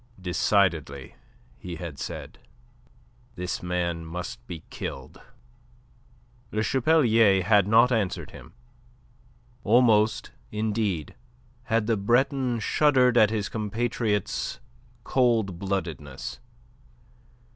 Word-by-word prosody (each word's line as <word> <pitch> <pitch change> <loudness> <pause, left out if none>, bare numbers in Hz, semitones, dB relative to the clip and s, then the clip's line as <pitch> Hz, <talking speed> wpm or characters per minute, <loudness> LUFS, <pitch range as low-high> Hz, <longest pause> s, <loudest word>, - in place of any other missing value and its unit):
"Decidedly," 85 -7 0 0.5
he 90 -2 -7
had 80 -4 -7
said, - - -7 1.0
"this 90 -2 -4
man 85 -2 -2
must 85 -5 -7
be 80 -2 -7
killed." 65 -1 -7 1.3
Le 110 0 -1
Chapelier 115 - +3
had 100 0 +4
not 115 +4 +5
answered 105 -6 -1
him. - - -13 1.1
Almost, 110 -1 +3 0.2
indeed, 105 -7 -2 0.5
had 115 -1 +1
the 115 0 +1
Breton 125 +4 +1
shuddered 130 +1 +3
at 110 -4 +6
his 105 -2 -2
compatriot's 110 0 -2 0.4
cold 115 -8 +1
bloodedness. 85 -9 -4
105 Hz, 90 wpm, -26 LUFS, 90-115 Hz, 1.3 s, at